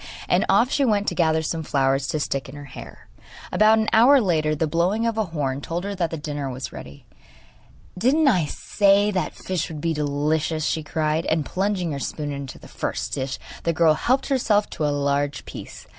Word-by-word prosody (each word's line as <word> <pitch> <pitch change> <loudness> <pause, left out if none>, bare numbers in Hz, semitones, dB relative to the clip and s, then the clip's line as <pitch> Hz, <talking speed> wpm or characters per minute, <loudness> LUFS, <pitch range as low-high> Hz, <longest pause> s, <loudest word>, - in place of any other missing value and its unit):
And - - +2
off 250 +4 +4
she 285 - +2
went 210 -5 +1
to - - -5
gather 160 -2 +2
some 160 +1 -2
flowers 135 -2 +1
to 155 - -1
stick 135 -2 -2
in 135 - -10
her 145 0 -9
hair. 130 - -11 0.4
About 215 +1 +5
an 220 0 +1
hour 250 +5 +7
later 155 -8 +1
the 160 - 0
blowing 175 +8 +1
of 230 -1 0
a 220 -1 0
horn 145 -5 -3
told 170 +4 -4
her 200 +1 -3
that 165 -5 -3
dinner 145 -3 -3
was 130 +1 -6
ready. 70 0 -11 0.9
'Didn't 270 +11 +3
I 185 - +3
say 200 +5 +2
that 185 -2 -2
fish 180 -3 -3
would 155 -2 -7
be 165 +2 -1
delicious?' 150 +1 -1
she 160 - 0
cried; 155 +1 -1
and 160 -2 +1
plunging 185 -2 -1
her 140 - -3
spoon 145 +1 -4
into 140 -2 -6
the - - -4
dish 130 -1 -3 0.2
the 170 - 0
girl 160 -1 +4
helped 255 - +1
herself 215 -6 +1
to 150 - -1
a 145 -1 -1
large 140 0 -1
piece. - - -9
160 Hz, 200 wpm, -23 LUFS, 145-200 Hz, 0.9 s, hour